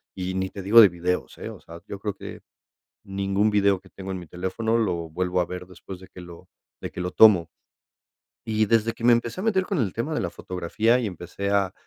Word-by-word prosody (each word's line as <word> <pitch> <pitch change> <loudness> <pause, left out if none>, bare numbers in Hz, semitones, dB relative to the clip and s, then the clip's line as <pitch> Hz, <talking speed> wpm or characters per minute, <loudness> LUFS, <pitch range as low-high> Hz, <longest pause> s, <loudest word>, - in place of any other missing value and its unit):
y 95 0 -3
ni 95 0 -1
te 100 - -8
digo 110 +4 +7
de 105 - +9
videos, 90 +1 -3
¿eh? - - -6
O - - -10
sea, 85 +1 -12
yo 100 - -7
creo 105 -1 -3
que - - -9 0.6
ningún 100 +1 0
video 100 -2 +3
que - - -19
tengo 95 0 -8
en 95 - -4
mi 85 - -11
teléfono 95 +7 -1
lo 85 -7 -1
vuelvo 90 +2 -1
a - - 0
ver 90 0 -7
después 90 0 -10
de 95 - -13
que 90 - -11
lo 85 +1 -12 0.3
de - - -5
que 90 - -6
lo 90 - -2
tomo. 95 -7 +6 1.0
Y 110 -1 +1
desde 115 0 +2
que 115 - -9
me 120 - +7
empecé 120 +8 -2
a - - -4
meter 190 -4 +2
con 190 -4 -2
el 105 -8 0
tema 130 +8 -3
de - - 0
la - - -1
fotografía, 105 +7 0
y 115 - -2
empecé 90 +2 -5
a, 100 -2 +1
95 Hz, 240 wpm, -25 LUFS, 90-110 Hz, 1.0 s, de